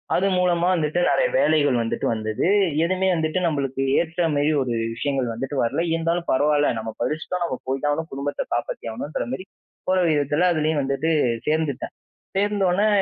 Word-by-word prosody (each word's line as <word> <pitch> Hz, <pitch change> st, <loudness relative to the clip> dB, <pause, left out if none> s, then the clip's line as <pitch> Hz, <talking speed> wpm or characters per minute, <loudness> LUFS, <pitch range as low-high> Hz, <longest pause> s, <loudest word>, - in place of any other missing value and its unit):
அது 195 Hz, -, +2 dB
மூலமா 175 Hz, -1 st, +2 dB
வந்துட்டு 160 Hz, -1 st, 0 dB
நிறைய -, -, +3 dB
வேலைகள் 145 Hz, -, +3 dB
வந்துட்டு 115 Hz, -, -2 dB
வந்தது. 110 Hz, -1 st, -2 dB, 0.4 s
எதுமே 185 Hz, +2 st, +1 dB
வந்துட்டு 160 Hz, +2 st, 0 dB
நம்மளுக்கு 135 Hz, -4 st, -2 dB, 0.2 s
ஏற்றமாரி 160 Hz, -3 st, +1 dB
ஒரு 125 Hz, -2 st, -2 dB, 0.2 s
விஷயங்கள் 130 Hz, -1 st, -1 dB
வந்துட்டு 135 Hz, +5 st, -4 dB
வரல. 140 Hz, +7 st, 0 dB
இருந்தாலும் 165 Hz, +1 st, -1 dB
பரவால்ல, 145 Hz, +2 st, +3 dB
நம்ம 110 Hz, 0 st, -4 dB
படிச்சிட்டோம். 160 Hz, +7 st, -2 dB
நம்ம 130 Hz, -, -3 dB
போய் 135 Hz, +1 st, -1 dB
தான் 145 Hz, -, +2 dB
ஆகணும். 160 Hz, +2 st, -2 dB
குடும்பத்த 140 Hz, +1 st, -3 dB
காப்பாத்தி 120 Hz, -, -3 dB
ஆகணுன்ற 145 Hz, +6 st, -4 dB
மாரி 185 Hz, +8 st, -5 dB, 0.4 s
போற 185 Hz, -, +3 dB
விதத்தில 150 Hz, +4 st, +2 dB
அதிலேயும் 155 Hz, -2 st, +1 dB
வந்துட்டு 140 Hz, +4 st, 0 dB, 0.4 s
சேர்ந்துட்டேன். 150 Hz, -3 st, -1 dB, 0.4 s
சேர்ந்தவுனே 200 Hz, -1 st, +2 dB
150 Hz, 150 wpm, -23 LUFS, 135-170 Hz, 0.4 s, நிறைய